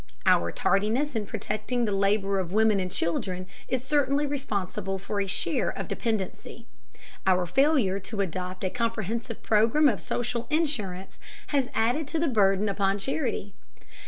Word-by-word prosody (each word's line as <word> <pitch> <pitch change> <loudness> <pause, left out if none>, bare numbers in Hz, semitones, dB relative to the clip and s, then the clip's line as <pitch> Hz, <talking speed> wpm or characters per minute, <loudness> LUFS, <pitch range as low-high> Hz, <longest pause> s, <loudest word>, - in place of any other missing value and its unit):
Our 85 0 +4
tardiness 225 - +1
in 210 -2 -1
protecting 215 +4 -2
the 210 - -1
labor 195 0 +2
of 180 -2 -3
women 215 0 +3
and 185 -1 -2
children 185 +1 -2 0.2
is 255 0 -1
certainly 285 +1 +2
responsible 200 -8 -2
for 200 +2 -3
a 195 - -1
share 190 - 0
of - - -5
dependency. 225 +1 -3 0.6
Our 185 -1 +4
failure 255 - +3
to 200 +2 -3
adopt 185 0 -4
a 185 - 0
comprehensive 230 -1 -2
program 225 +8 +4
of 220 -8 +1
social 240 -1 -2
insurance 215 - -1 0.3
has 275 -3 +1
added 245 +7 +1
to 325 - -2
the 330 - +2
burden 200 -3 +3
upon 195 0 +1
charity. 230 -3 -2
210 Hz, 150 wpm, -27 LUFS, 195-250 Hz, 0.6 s, Our